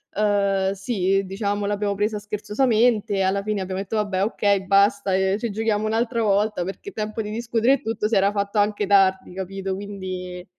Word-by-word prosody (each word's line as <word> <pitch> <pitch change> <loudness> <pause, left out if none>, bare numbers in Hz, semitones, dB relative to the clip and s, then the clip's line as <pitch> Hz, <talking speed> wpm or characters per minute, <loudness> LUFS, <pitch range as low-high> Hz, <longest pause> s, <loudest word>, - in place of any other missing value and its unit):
ehm, 200 -2 +1
sì, 195 -1 0
diciamo 200 +1 -2
l'abbiamo 205 0 -1
presa 210 +2 -1
scherzosamente, 215 0 +1
alla 195 +1 0
fine 210 0 -2
abbiamo 190 +1 -3
detto: 200 +3 -3
"Vabbè, 200 -3 0
okay, 200 -2 +1
basta, 200 0 +3
ehm, 190 +1 +1
ci 225 0 -3
giochiamo 215 0 0
un'altra 230 +1 0
volta," 205 -2 +1
perché 195 - -7
tempo 215 - -4
di 210 - -5
discutere 230 +2 +1
e 275 - 0
tutto 225 -1 -2
si 220 - 0
era 195 +1 +3
fatto 200 +1 -2
anche 205 0 +1
tardi, 190 -2 +3
capito, 190 +1 -4
quindi 185 -3 -6
205 Hz, 175 wpm, -23 LUFS, 195-215 Hz, -, basta